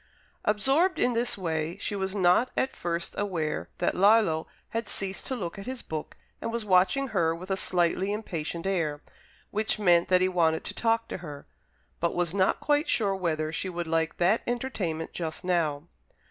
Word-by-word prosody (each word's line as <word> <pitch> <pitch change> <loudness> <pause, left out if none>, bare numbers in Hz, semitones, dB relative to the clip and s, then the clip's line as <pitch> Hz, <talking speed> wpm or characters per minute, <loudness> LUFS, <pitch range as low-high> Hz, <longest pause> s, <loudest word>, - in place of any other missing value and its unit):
Absorbed 270 - +3
in 245 - +2
this 235 -1 0
way, 165 -1 -2
she 205 - -3
was 190 0 -2
not 185 +6 +4
at 265 - 0
first 170 0 -2
aware 170 -7 -2
that - - +1
Lillo 195 -5 +4 0.2
had 230 -1 -3
ceased 195 -1 -3
to 260 - -1
look 185 -5 -5
at 195 - -8
his 260 -1 -5
book, 155 -1 -6 0.2
and 230 - -2
was 230 -1 -3
watching 190 +8 +3
her 165 -4 +1
with 185 +3 -7
a - - +3
slightly 185 +1 +1
impatient 170 -5 -4
air, 160 -6 -1 0.5
which 215 +1 0
meant 175 -5 +4
that 185 -1 +4
he 185 - +4
wanted 165 -3 +2
to - - -6
talk 230 0 +1
to - - -3
her, 150 -5 -9 0.5
but 170 - 0
was 175 -1 0
not 190 -1 +2
quite 295 +2 +1
sure 210 -5 +2
whether 155 -4 -1
she 185 - -2
would 175 -1 -3
like 160 0 0
that 190 +6 +3
entertainment 215 -10 -2
just 165 0 -4
now. 165 -5 +1
185 Hz, 185 wpm, -28 LUFS, 165-215 Hz, 0.5 s, not